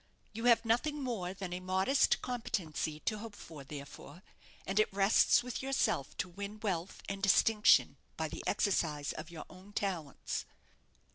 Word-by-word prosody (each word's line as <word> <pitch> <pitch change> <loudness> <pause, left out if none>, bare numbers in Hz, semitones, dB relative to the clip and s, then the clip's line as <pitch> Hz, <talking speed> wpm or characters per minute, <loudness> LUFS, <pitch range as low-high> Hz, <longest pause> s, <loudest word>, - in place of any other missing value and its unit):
You 225 +2 -4
have 235 -1 +5
nothing 285 +6 +1
more 210 -8 -2
than 190 -2 -5
a 180 - -3
modest 190 +9 +2
competency 180 -11 -3
to 215 -1 -1
hope 220 -1 -8
for, 155 -7 -10
therefore; 145 +5 -10 0.4
and 195 +2 0
it 215 - +3
rests 200 +4 +4
with 250 -1 -4
yourself 265 - 0
to 180 - -1
win 200 +4 -7
wealth 185 -4 -3
and 195 0 -4
distinction 210 +2 +5 0.2
by - - -1
the - - -7
exercise 155 -8 0
of 155 +1 -7
your 170 -2 -8
own 185 +3 -15
talents." 180 -9 -3
195 Hz, 155 wpm, -33 LUFS, 170-225 Hz, 0.4 s, have